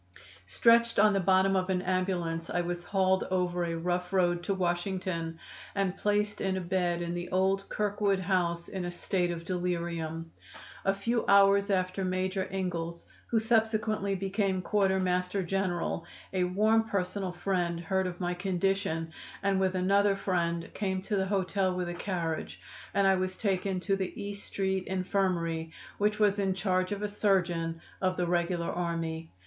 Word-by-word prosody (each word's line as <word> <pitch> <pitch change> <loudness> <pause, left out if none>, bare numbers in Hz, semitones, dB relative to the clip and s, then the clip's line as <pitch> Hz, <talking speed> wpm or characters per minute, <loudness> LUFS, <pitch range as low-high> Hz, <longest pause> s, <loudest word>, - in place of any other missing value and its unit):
Stretched 230 - +4
on 210 0 +6
the 195 - +2
bottom 190 +1 +3
of 185 0 0
an 185 -1 0
ambulance 175 -3 -1
I 175 - 0
was 175 0 -3
hauled 190 -1 +2
over 180 -1 0
a 170 -1 -2
rough 180 +1 -1
road 175 -2 +2
to 195 - +1
Washington 175 -2 -2 0.4
and 195 -2 0
placed 205 0 0
in 190 -1 0
a - - 0
bed 175 -1 0
in 170 0 -3
the 175 0 -4
old 190 +1 +1
Kirkwood 205 -1 +1
House 175 -2 0
in 190 -2 -4
a 175 - -2
state 175 0 -1
of 170 -1 -4
delirium. 170 -2 -3 0.5
A 195 - +4
few 230 +4 0
hours 200 0 +5
after 185 0 0
Major 185 +1 -1
Ingalls, 170 -3 -3 0.2
who 235 - +1
subsequently 220 -3 +1
became 195 -1 -1
Quarter 195 -1 +2
Master 180 +1 0
General, 175 -2 -1 0.3
a 185 -1 +2
warm 220 +4 +2
personal 190 -1 -1
friend, 175 -1 -1
heard 190 +2 0
of 175 -1 -6
my 175 -1 -1
condition, 180 -3 -1 0.3
and 195 -1 +2
with 190 -1 +1
another 200 +2 +3
friend 170 -3 -1
came 190 -2 -2
to 205 - -1
the 190 -1 +1
hotel 190 -1 0
with 180 -1 -2
a 175 - -3
carriage, 175 -3 -3 0.4
and 200 - +4
I 195 - +6
was 185 0 -1
taken 190 -2 0
to 195 +1 +1
the 190 -2 -4
E 205 0 -4
Street 190 -1 -2
Infirmary, 180 -4 -1 0.3
which 210 +1 +2
was 205 -1 +3
in 190 -2 +1
charge 185 -1 0
of 205 0 -3
a - - +1
surgeon 175 -5 0 0.2
of 185 -1 +1
the 180 - +1
regular 170 0 0
army. 165 -2 -3
185 Hz, 165 wpm, -30 LUFS, 175-195 Hz, 0.5 s, on